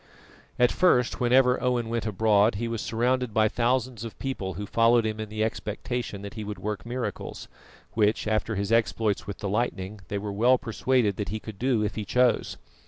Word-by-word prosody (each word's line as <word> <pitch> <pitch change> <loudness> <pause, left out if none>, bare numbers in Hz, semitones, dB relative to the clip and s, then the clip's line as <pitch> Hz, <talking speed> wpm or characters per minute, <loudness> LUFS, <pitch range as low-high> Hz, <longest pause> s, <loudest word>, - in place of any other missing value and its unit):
At 125 0 +4
first 125 -9 +3
whenever 125 +1 +4
Owen 125 -2 0
went 115 0 -2
abroad 105 +1 +3
he 115 +3 -2
was 115 -1 -3
surrounded 125 0 0
by 110 0 +5
thousands 125 0 0
of 115 - -7
people 100 -8 -4
who 105 - -4
followed 115 +2 +3
him 110 0 -2
in 110 -1 -5
the 110 0 -1
expectation 110 -1 -3
that 100 - -7
he 110 - -6
would 105 0 -5
work 105 +2 -4
miracles, 125 0 -5 0.5
which, 105 -1 +1
after 110 +1 0
his 100 +2 -2
exploits 110 -2 +1
with 100 - -5
the 100 - -4
lightning, 105 -1 -2
they 100 - -3
were 100 0 -4
well 120 +5 +4
persuaded 120 -4 0
that 105 - -3
he 110 - -3
could 105 -2 -10
do 125 -4 +1
if 105 - -1
he 110 - -4
chose. 125 +3 +1
110 Hz, 195 wpm, -26 LUFS, 105-120 Hz, 0.5 s, by